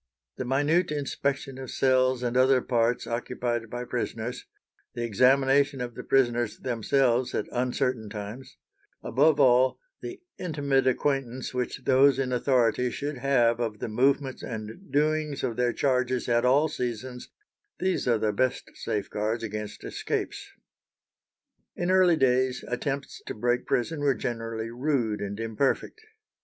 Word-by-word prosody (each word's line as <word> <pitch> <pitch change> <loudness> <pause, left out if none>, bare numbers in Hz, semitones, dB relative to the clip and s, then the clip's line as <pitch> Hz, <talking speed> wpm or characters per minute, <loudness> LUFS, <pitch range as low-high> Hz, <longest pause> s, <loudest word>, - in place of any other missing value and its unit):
The 130 - -3
minute 145 +7 +2
inspection 140 -2 -2
of 130 -2 -7
cells 130 -1 +2
and 120 0 -1
other 130 +1 +5
parts 120 -1 0
occupied 120 -1 -3
by 120 +1 -5
prisoners; 120 -1 -4 0.5
the 120 - -2
examination 135 +5 +3
of 120 -1 -4
the - - -7
prisoners 120 -4 +1
themselves 125 +1 +1
at - - -1
uncertain 125 -2 -1
times; 105 +5 -8 0.5
above 145 +5 +3
all, 130 -1 +5 0.2
the 365 +1 -7 0.2
intimate 140 -6 0
acquaintance 130 -1 -1
which 125 +1 -3
those 135 +1 +5
in 135 -2 -1
authority 125 -1 +2
should 145 +2 -4
have 120 -3 +3
of 115 -3 -2
the - - -4
movements 135 +4 +1
and 110 - -7
doings 150 0 0
of 115 - -1
their 125 0 +1
charges 130 -2 0
at 120 0 +2
all 140 +5 +4
seasons—these 125 - -5
are 120 -2 +4
the 105 -1 0
best 130 +4 -1
safeguards 105 +2 -2
against 105 -1 -5
escapes. - - -4 1.3
In 175 +1 -1
early 185 -3 +5
days 130 -2 +2
attempts 135 +3 -3
to - - -4
break 120 +3 0
prison 150 +6 0
were 140 -2 +2
generally 115 0 -4
rude 120 -5 -1
and 100 +1 -4
imperfect. 115 - -1
125 Hz, 135 wpm, -27 LUFS, 120-135 Hz, 1.3 s, other